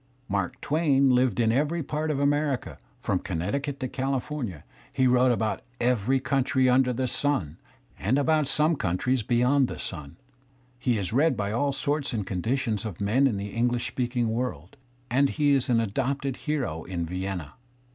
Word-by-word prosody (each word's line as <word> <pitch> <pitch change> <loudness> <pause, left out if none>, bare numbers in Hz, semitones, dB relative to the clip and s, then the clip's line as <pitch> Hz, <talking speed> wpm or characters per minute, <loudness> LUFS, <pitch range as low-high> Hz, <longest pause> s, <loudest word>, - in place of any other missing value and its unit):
Mark 100 -3 -2
Twain 140 -3 +3
hved 125 -4 +2
in 115 -1 +3
every 150 +6 0
part 155 +3 -2
of 145 -3 0
America, 145 -1 0 0.2
from - - 0
Connecticut 140 - -3
to 130 - -1
California, 130 - -3 0.3
he 130 - +1
wrote 125 0 +4
about 110 -2 -1 0.2
every 125 +1 +2
country 130 -1 +1
imder 125 0 +3
the 130 +1 0
sim 120 - -1 0.4
(and 115 +8 +1
about 155 0 +2
some 150 +4 +2
coimtries 120 - 0
beyond 125 +5 +3
the - - -6
sim), 75 -6 -7 0.6
he 125 -3 +1
is 100 +1 -2
read 155 +6 +3
by 100 0 -1
all 140 +6 +1
sorts 145 0 -1
and 105 -4 -2
conditions 110 +3 -1
of 105 -7 -6
men 115 +8 +3
in 110 -6 -1
the 100 +1 -4
English 120 +2 0
speaking 120 -1 -1
worid, 110 - -3 0.4
and 135 +3 +3
he 145 -2 +4
is 135 -2 +1
an 120 -2 +4
adopted 135 +5 -1
hero 130 - -2
in 85 -2 -3
Vienna. 90 -3 -4
125 Hz, 165 wpm, -26 LUFS, 105-140 Hz, 0.6 s, wrote